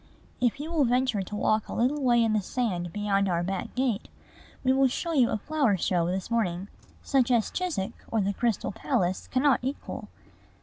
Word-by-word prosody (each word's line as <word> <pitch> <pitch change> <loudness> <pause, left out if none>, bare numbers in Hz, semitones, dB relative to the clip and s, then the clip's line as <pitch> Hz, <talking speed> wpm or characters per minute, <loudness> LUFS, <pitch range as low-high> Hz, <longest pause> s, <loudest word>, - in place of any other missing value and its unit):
If 250 +2 +1
you 310 +3 -5
will 320 -4 +3
venture 250 -3 +1
to 195 +2 -6
walk 215 +1 +1
a - - -6
little 265 +6 +1
way 240 -3 +4
in 225 -1 +2
the 215 - +2
sand 185 -5 -2
beyond 200 -1 +1
our 170 -1 +1
back 190 +1 -4
gate, 250 -5 0 0.6
we 260 0 +4
will 270 0 +4
show 330 +6 -2
you 255 -6 +4
a - - 0
flower 270 -3 +1
show 175 -1 +1
this 185 +5 -3
morning 195 -4 0 0.3
such 265 -3 +2
as 235 -3 +2
Chiswick 345 - -2 0.2
or 225 - +1
the 200 0 +1
Crystal 230 0 0
Palace 190 -5 -1
cannot 265 +1 +3
equal. 265 +3 -5
230 Hz, 190 wpm, -27 LUFS, 195-260 Hz, 0.6 s, way